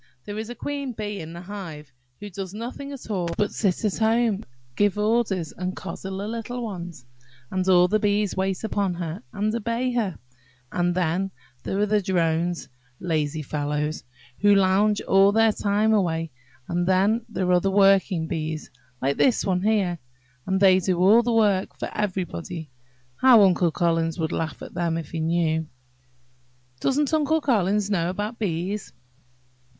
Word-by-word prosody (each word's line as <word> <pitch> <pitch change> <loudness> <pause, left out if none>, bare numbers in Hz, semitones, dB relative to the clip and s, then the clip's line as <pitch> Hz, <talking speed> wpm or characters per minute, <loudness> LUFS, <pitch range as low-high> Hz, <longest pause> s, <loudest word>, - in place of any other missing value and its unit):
There 205 +1 -5
is 220 - -4
the 240 - -7
queen 280 +1 -4
bee 210 -2 -4
in 160 +1 -8
the 170 - -8
hive, 175 -7 -8 0.3
who 205 0 -8
does 190 +1 -6
nothing 250 +5 -6
at 265 -5 -8
all 180 -4 -1
but 210 -1 +1
sit 200 0 0
at 205 - 0
home, 225 -2 +2 0.3
give 205 0 +2
orders, 210 -6 +1
and 185 +1 -4
coddle 190 0 -6
the 200 +2 -4
little 230 +2 -4
ones; 175 - -7 0.5
and 185 0 0
all 180 -1 +6
the 215 +4 +2
bees 205 -1 +1
wait 190 +1 -1
upon 200 -4 -1
her, 170 -1 -5
and 210 +2 -1
obey 235 +2 -1
her. 215 -9 -1 0.6
Then 175 +1 0 0.3
there 190 - -3
are 205 - +3
the 210 0 +2
drones–lazy 160 -4 -2
fellows, 150 +1 -2 0.4
who 205 0 +5
lounge 195 +2 +3
all 195 +1 +5
their 225 +1 +4
time 210 +1 +1
away. 165 -5 0 0.4
And 175 +1 -1
then 200 +5 +3
there 185 -4 -1
are 180 0 +4
the 195 - +1
working 195 -3 +4
bees, 155 -2 -4 0.3
like 140 +1 +1
this 255 -4 +3
one 185 -2 +1
here, 195 -5 +1 0.5
and 190 0 +1
they 190 -1 +6
do 185 -1 0
all 200 +6 +6
the 240 0 -1
work 205 -4 +2
for - - -5
everybody. 180 -5 -3 0.5
How 250 -5 +7
Uncle 180 -2 +4
Collins 165 0 0
would 160 -2 -1
laugh 160 -1 -3
at - - -9
them, 170 -1 -1
if 165 -3 -6
he 165 - -3
knew!" 160 -1 0 1.1
"Doesn't 285 - +1
Uncle 315 +1 +2
Collins 210 - +1
know 170 -3 +1
about 205 +5 -4
bees?" 190 +1 -3
190 Hz, 165 wpm, -24 LUFS, 170-210 Hz, 1.1 s, How